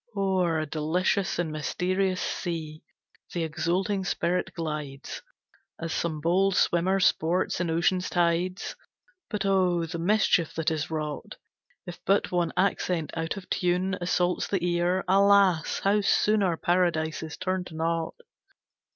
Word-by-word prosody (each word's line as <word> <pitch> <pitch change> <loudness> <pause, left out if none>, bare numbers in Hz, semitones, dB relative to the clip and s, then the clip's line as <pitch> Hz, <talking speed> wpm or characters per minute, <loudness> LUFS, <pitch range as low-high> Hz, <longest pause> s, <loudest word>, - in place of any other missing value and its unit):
O'er 185 -4 +1
a 155 - -1
delicious 165 +6 0
and 170 -2 -1
mysterious 185 +5 -1
sea, 160 -3 -4 0.5
The 170 - 0
exulting 175 +5 -1
spirit 180 0 -1
glides, 150 -5 -5 0.6
As 165 -1 -3
some 160 -3 -2
bold 185 +4 +2
swimmer 185 +3 +2
sports 180 0 +1
in 175 - -1
Ocean's 180 +3 +1
tides: 175 +1 0 0.5
But 210 -2 -2
oh, 180 -3 +2
the 170 +1 -5
mischief 180 -2 +2
that 160 0 0
is 155 -2 -2
wrought, 155 -2 -4 0.5
If 175 - -9
but 200 +1 +2
one 175 -2 +1
accent 180 -4 0
out 165 +3 -2
of 190 - -9
tune 180 +2 +1
Assaults 180 0 0
the 190 -3 -1
ear! 175 +2 +1
Alas, 195 -3 +4
how 205 +2 +3
soon 210 +1 +3
Our 175 -4 +1
paradise 170 -3 +1
is 160 -1 -7
turned 185 -1 -2
to 160 - -11
naught! 165 0 -1
175 Hz, 140 wpm, -27 LUFS, 165-185 Hz, 0.6 s, Alas